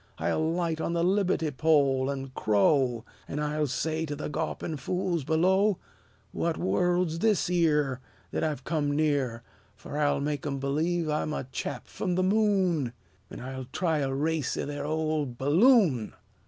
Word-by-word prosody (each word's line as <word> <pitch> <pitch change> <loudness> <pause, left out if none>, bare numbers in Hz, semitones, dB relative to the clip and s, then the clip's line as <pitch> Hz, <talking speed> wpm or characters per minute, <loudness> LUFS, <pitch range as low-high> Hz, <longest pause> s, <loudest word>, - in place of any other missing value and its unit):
I'll 160 +1 0
light 165 -2 -1
on 170 - -1
the 170 0 +1
libbe'ty 185 -4 +1
pole, 140 -4 +3
an' 135 -1 -4
crow; 120 +3 +2 0.2
An' - - -5
I'll 150 0 0
say 160 +4 -1
to 145 - -3
the 150 - -5
gawpin' 155 0 -3
fools 180 -2 -1
below, 185 +6 +3 0.5
'What 165 -1 -1
world 175 - +1
's 165 - -4
this 210 -3 +2
'ere 150 -7 +2 0.3
That - - -1
I've 150 -4 -2
come 145 -1 0
near?' 140 -6 0 0.3
Fer 145 +7 -6
I'll 145 -2 +2
make 145 0 -2
'em 140 -1 -2
b'lieve 160 +5 0
I'm 150 0 -1
a - - -2
chap - - -4
f'm 180 -3 -3
the 185 - +2
moon! 185 - +2 0.4
An' - - -9
I'll 130 +1 -6
try 160 +4 -1
a 135 -2 -1
race 150 +1 -1
'ith - - -3
their 145 0 -4
ol' 155 -1 0
bulloon." 145 - +3
155 Hz, 165 wpm, -28 LUFS, 140-170 Hz, 0.5 s, pole